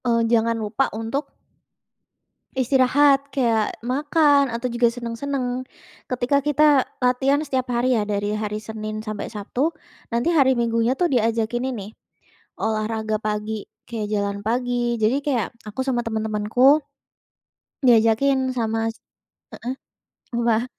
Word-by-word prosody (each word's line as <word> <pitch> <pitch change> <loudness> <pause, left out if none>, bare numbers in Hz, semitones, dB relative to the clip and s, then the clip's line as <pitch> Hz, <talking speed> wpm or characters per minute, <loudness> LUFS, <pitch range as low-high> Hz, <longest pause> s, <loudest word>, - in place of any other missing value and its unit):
Eee, 230 -1 +3
jangan 230 0 +2
lupa 220 +5 0
untuk 270 +6 -3 1.2
istirahat 270 +2 +3
kayak 230 -6 0
makan 285 +2 +2
atau 235 +2 -2
juga 235 -1 +2
senang-senang. 245 +2 -3 0.5
Ketika 255 +3 +1
kita 295 -2 +4 0.2
latihan 265 +3 +2
setiap 255 -2 -1
hari 245 +1 +2
ya 215 - +1
dari 205 0 -1
hari 210 0 -3
Senin 215 0 -6
sampai 215 -1 -5
Sabtu, 245 +8 -1 0.4
nanti 240 +9 +1
hari 270 -4 +5
Minggunya 230 0 +1
tuh 355 - +3
diajakin 235 0 0
ini, 215 -3 -7 0.6
olahraga 220 0 -1
pagi 210 0 -2 0.2
kayak 225 -3 -4
jalan 200 -1 -1
pagi, 240 0 0
jadi 220 +5 +2
kayak 250 -9 0 0.2
aku 210 +4 -9
sama 245 -2 +1
teman-temanku, 220 +6 +2 1.0
diajakin 250 +3 +4
sama 225 -1 0 0.6
heeh, 250 +2 -5 0.6
apa? 235 0 +1
235 Hz, 120 wpm, -23 LUFS, 220-265 Hz, 1.2 s, hari